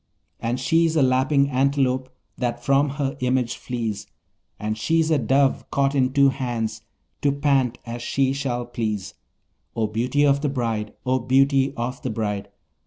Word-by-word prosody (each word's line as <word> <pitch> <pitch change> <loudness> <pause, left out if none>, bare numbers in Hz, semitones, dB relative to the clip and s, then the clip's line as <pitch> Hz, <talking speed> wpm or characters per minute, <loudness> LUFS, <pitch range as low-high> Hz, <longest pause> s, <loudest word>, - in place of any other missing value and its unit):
And 120 +2 -2
she's 165 +4 +2
a 150 - +4
lapping 135 +2 +2
antelope 130 -1 +1 0.3
that 120 -2 -3
from 140 +1 +3
her 135 -2 -1
image 125 -1 0
flees; 115 -5 -4 0.5
And 105 +1 -2
she's 160 +8 +1
a 155 - +3
dove 135 +3 +1
caught 140 0 +1
in 130 -2 +2
two 140 0 +5
hands, 115 -5 -3 0.4
to 145 - +3
pant 135 -4 +1
as 120 0 -6
she 135 +2 +1
shall 125 -3 -2
please; 110 -5 -3 0.6
O 115 - +1
beauty 125 +7 +1
of 140 0 +3
the 145 - 0
bride! 115 -5 -2
O 130 +1 +2
beauty 135 +2 +3
of 120 +2 -3
the 130 - -3
bride! 105 -3 -3
130 Hz, 160 wpm, -23 LUFS, 120-140 Hz, 0.6 s, two